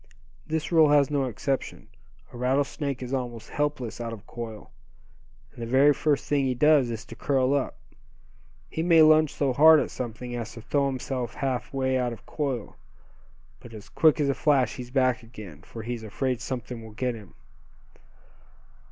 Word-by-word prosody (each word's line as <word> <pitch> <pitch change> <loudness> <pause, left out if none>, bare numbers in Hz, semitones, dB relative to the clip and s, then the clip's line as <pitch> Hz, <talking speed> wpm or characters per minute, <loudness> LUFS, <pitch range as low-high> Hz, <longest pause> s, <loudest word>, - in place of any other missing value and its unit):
This 160 +1 -2
rule 160 -3 +6
has 145 -1 +4
no 140 -2 +1
exception. 130 +3 -3 0.5
A - - -8
rattlesnake 135 +1 -1
is 125 +1 -6
almost 120 -4 -4
helpless 145 -6 -2
out 115 -1 -4
of 110 -1 -9
coil, 115 -3 -8 0.8
and - - -11
the 115 - -4
very 135 +4 +5
first 145 -1 0
thing 140 -2 +1
he 130 -1 0
does 150 -1 +4
is 115 0 -5
to 115 - -11
curl 135 +2 +1
up. 140 -2 -1 0.9
He 160 - -4
may 165 -1 +6
lunge 155 -1 +5
so 135 -3 0
hard 155 +4 +7
at - - -2
something 120 0 -6
as 115 -2 -5
to 115 - -10
throw 140 +2 +1
himself 130 -2 -4
half 130 -4 -2
way 130 -1 0
out 125 -1 -1
of 115 - -13
coil; 135 -7 -4 0.8
but 115 -2 -12
as 105 - -11
quick 155 -1 +3
as 145 - +2
a 140 - +2
flash 140 -3 +1
he's 125 -1 -7
back 130 -2 +1
again, 105 -9 -11
for 115 +5 -9
he's 120 0 -4
afraid 120 +3 -2
something 125 -2 -5
will 110 -1 -11
get 125 +3 -1
him." 105 -6 -12
130 Hz, 180 wpm, -26 LUFS, 120-145 Hz, 0.9 s, hard